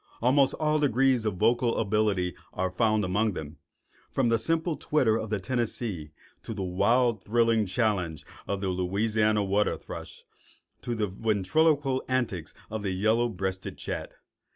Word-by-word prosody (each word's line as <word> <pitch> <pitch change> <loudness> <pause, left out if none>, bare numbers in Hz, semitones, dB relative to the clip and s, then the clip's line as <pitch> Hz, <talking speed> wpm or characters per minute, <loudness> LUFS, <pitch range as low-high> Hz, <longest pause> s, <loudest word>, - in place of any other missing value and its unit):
Almost 135 +3 +3
all 155 -1 +1
degrees 130 -3 +2
of 105 -3 0
vocal 115 +4 +2
ability 105 -4 +1 0.2
are 95 0 -1
found 110 +1 +2
among 105 +4 +1
them, 80 -2 -7 0.5
from 130 -3 +1
the 115 -1 +3
simple 165 +5 0
twitter 130 -6 +2
of 110 -1 -3
the 105 -1 -1
Tennessee 110 -6 -3 0.3
to 115 - -6
the 100 - -3
wild 110 +6 +2
thrilling 115 -1 +2
challenge 90 -6 -1 0.2
of 100 -1 -2
the 95 - -1
Louisiana 105 +4 +1
water 100 +2 +1
thrush - - -9 0.6
or 120 - 0
the 110 -1 0
ventriloquial 130 - +1
antics 120 -10 -1 0.2
of 110 -1 -3
the 100 - -2
yellow 110 +6 +2
breasted 95 -2 -4
chat. - - -5
110 Hz, 150 wpm, -28 LUFS, 95-120 Hz, 0.6 s, Almost